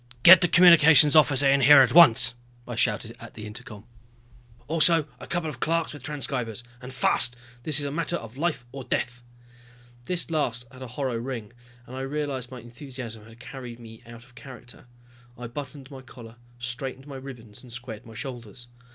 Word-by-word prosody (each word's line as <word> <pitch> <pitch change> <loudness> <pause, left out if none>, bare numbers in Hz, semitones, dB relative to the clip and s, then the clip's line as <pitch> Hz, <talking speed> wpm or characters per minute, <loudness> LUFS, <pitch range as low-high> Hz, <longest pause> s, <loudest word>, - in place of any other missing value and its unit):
"Get 175 +1 +10
the 175 - +4
Communications 160 -4 +6
Officer 145 -3 +4
in 140 0 +3
here 140 +1 +8
at 125 - -1
once," 135 -8 +7 0.3
I 120 - -6
shouted 115 0 -1
at 115 - -13
the 105 - -9
intercom. 105 -1 -10 0.8
"Also 165 0 +4
a - - -10
couple 175 -2 -3
of 145 -5 -7
clerks 165 +2 -1
with 145 - -11
transcribers. 125 -5 -5 0.2
And 125 +1 -9
fast 125 -1 +1 0.3
this 150 +3 +1
is 145 - -3
a 140 - -4
matter 170 +3 -3
of 115 -6 -8
life 150 -4 -2
or 135 0 -8
death!" 125 0 -3 0.8
This 175 +1 -2
last 125 -6 -1
had 130 - -14
a 130 - -7
hollow 125 0 -4
ring, 115 -3 -6 0.3
and 125 - -11
I 130 - -5
realized 135 -2 -4
my 130 -2 -10
enthusiasm 120 -2 -9
had 115 +1 -17
carried 125 -2 -10
me 115 -1 -13
out 115 0 -12
of 125 0 -22
character. 125 -2 -13 0.5
I 120 - -8
buttoned 135 +2 -9
my 135 -1 -10
collar, 120 -3 -14 0.2
straightened 130 +2 -6
my 140 -2 -9
ribbons 120 -6 -11
and 125 - -15
squared 120 -2 -8
my 115 -2 -14
shoulders. 120 -2 -9
130 Hz, 185 wpm, -25 LUFS, 120-145 Hz, 0.8 s, Get